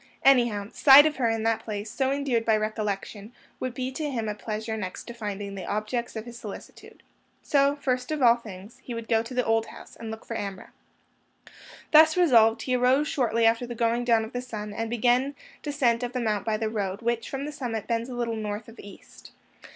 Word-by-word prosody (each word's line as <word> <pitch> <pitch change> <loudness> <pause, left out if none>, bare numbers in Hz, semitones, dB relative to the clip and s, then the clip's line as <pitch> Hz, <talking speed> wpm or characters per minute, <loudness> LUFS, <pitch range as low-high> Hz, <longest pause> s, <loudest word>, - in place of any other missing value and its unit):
Anyhow, 235 -7 +4
sight 280 +1 +8
of 310 -1 0
her 240 -3 +1
in 225 -1 -1
that 225 0 +1
place, 210 -1 -6
so 265 -1 0
endeared 275 -5 0
by 220 -1 +3
recollection, 215 0 -4 0.3
would 255 -1 -4
be 255 0 -3
to 295 +2 -3
him 230 -5 -3
a 210 - -1
pleasure 220 +1 -4
next 185 -4 -5
to 235 - -9
finding 205 -3 -5
the 195 -2 -7
objects 215 +4 -3
of 220 0 -5
his 240 -1 -10
solicitude. 205 -3 -11 0.4
So, 280 0 +3
first 255 -3 -2
of 310 -1 -2
all 240 -3 +6
things, 205 -2 -11
he 240 - -6
would 230 -1 -6
go 225 -1 +3
to 230 +3 -8
the 250 - +1
old 225 0 +1
house, - - -13
and 225 - -8
look 220 0 -8
for 230 - -5
Amrah. 200 -3 -6 1.2
Thus 315 +2 +7
resolved, 230 -10 +5
he 255 - 0
arose 255 +4 +3
shortly 230 -4 +1
after 230 +2 +2
the 240 - -6
going 235 +1 +1
down 230 -2 +3
of 220 - -12
the 245 - -2
sun, 210 -4 -6
and 225 +1 -3
began 245 +4 +1 0.3
descent 265 -6 +1
of 245 0 -4
the 255 - -1
Mount 215 -4 -1
by 220 -1 0
the 220 0 -2
road 205 -1 -3
which, 235 0 -1
from 275 +1 -4
the 300 - -5
summit, 235 -7 -4
bends 230 +1 -2
a 250 - -6
little 235 -1 -2
north 210 0 -4
of 230 +1 -14
east. 200 - -13
230 Hz, 220 wpm, -26 LUFS, 215-250 Hz, 1.2 s, sight